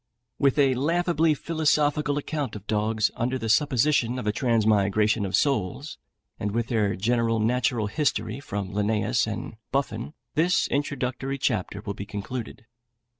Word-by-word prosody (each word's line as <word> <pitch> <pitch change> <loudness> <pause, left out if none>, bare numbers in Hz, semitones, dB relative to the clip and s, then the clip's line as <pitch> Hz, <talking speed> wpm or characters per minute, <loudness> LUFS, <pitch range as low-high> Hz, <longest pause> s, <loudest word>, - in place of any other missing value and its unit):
With 140 -1 +3
a 135 -2 +4
laughably 165 +3 +2
philosophical 150 -2 +1
account 145 -4 -3
of 105 -1 -9
dogs, 110 0 +1
under 125 +3 -1
the 115 -3 -4
supposition 125 0 +2
of 125 - -4
a 105 - +2
transmigration 110 -2 +2
of 95 - 0
souls, 135 - -1 0.4
and 105 - -1
with 115 0 -1
their 105 -4 +1
general 115 +2 +1
natural 115 0 +1
history 130 -1 -1
from 100 -7 -5
Linnæus 110 +2 +1
and 110 0 -6
Buffon, 130 0 -2 0.2
this 170 +3 +2
introductory 135 -1 -2
chapter 100 -5 -1
will 100 -1 -4
be 100 0 -7
concluded. 110 +3 -6
120 Hz, 140 wpm, -26 LUFS, 105-140 Hz, 0.4 s, a